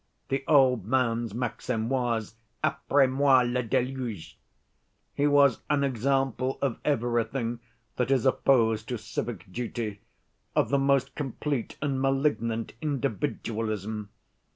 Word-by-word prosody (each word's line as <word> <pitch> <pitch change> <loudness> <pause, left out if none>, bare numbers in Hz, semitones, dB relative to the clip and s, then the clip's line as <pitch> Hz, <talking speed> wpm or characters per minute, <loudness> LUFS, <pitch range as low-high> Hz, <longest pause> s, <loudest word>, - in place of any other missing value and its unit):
The 135 0 -1
old 130 - +5
man's 120 -2 +1
maxim 120 -1 -2
was 120 -4 -1 0.3
Après 140 -1 +3
moi 130 -1 +4
le 125 +1 0
déluge. 125 -5 -2 0.8
He 145 - +2
was 140 -4 +5
an 145 -2 +2
example 135 0 0
of 135 -4 -1
everything 120 -2 0 0.4
that 125 0 0
is 135 -2 +2
opposed 115 -4 +3
to 125 - -2
civic 110 -3 -5
duty, 115 -4 -4 0.5
of - - +2
the 140 - +2
most 135 -1 +2
complete 140 -2 -3
and 135 -3 0
malignant 135 -5 0
individualism. 110 -7 -2
125 Hz, 115 wpm, -27 LUFS, 115-135 Hz, 0.8 s, old